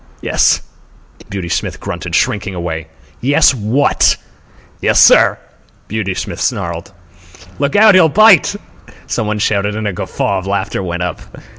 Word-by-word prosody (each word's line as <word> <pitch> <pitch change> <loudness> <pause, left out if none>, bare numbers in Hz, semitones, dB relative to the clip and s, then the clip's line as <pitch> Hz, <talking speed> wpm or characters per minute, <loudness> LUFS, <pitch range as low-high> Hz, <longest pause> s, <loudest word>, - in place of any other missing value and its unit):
"Yes," - - +2 0.7
Beauty 95 -3 -5
Smith - - -3
grunted, - - -5
shrinking 100 -2 -1
away. 80 -2 -5 0.3
"Yes 145 +3 +4
what?" 120 +4 +1 0.6
"Yes, - - +2
sir," - - +6 0.5
Beauty 100 -3 -3
Smith - - -5
snarled. 85 +3 -3 0.7
"Look 140 0 -1
out! 210 0 +6
He'll 180 -3 +5
bite!" 215 -1 +5 0.5
some 110 - -3
one 105 0 -2
shouted, 105 0 -1
and 110 -1 -3
a 100 - -2
guffaw 95 +2 -2
of 95 - -9
laughter 100 0 -2
went 90 -1 -4
up. 90 - -4
105 Hz, 140 wpm, -15 LUFS, 90-140 Hz, 0.7 s, sir